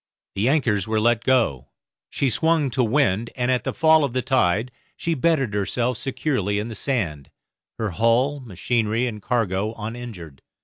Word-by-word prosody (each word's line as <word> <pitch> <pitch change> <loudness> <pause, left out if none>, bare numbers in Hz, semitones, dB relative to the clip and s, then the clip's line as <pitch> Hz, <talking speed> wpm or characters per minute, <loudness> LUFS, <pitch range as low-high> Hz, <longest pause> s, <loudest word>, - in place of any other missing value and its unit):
The 105 +6 +1
anchors 115 -10 +1
were 110 0 +1
let 120 +1 +2
go, 115 - +1 0.4
she 135 -3 0
swung 155 +2 +1
to 125 +2 +1
wind, 115 -3 +1
and 125 0 0
at 125 - +1
the - - 0
fall 160 -1 +4
of 135 -4 -1
the 130 -1 -1
tide 115 -1 +1 0.3
she 165 - -1
bedded 145 -6 +1
herself 115 +5 -1
securely 130 -7 -1
in 105 +3 -3
the - - -6
sand, 95 - -2 0.5
her 110 -3 -2
hull, 115 - +2
machinery, 115 +1 -1
and 110 -4 -5
cargo 110 -2 -1
uninjured. 105 - -8
120 Hz, 165 wpm, -23 LUFS, 105-130 Hz, 0.5 s, fall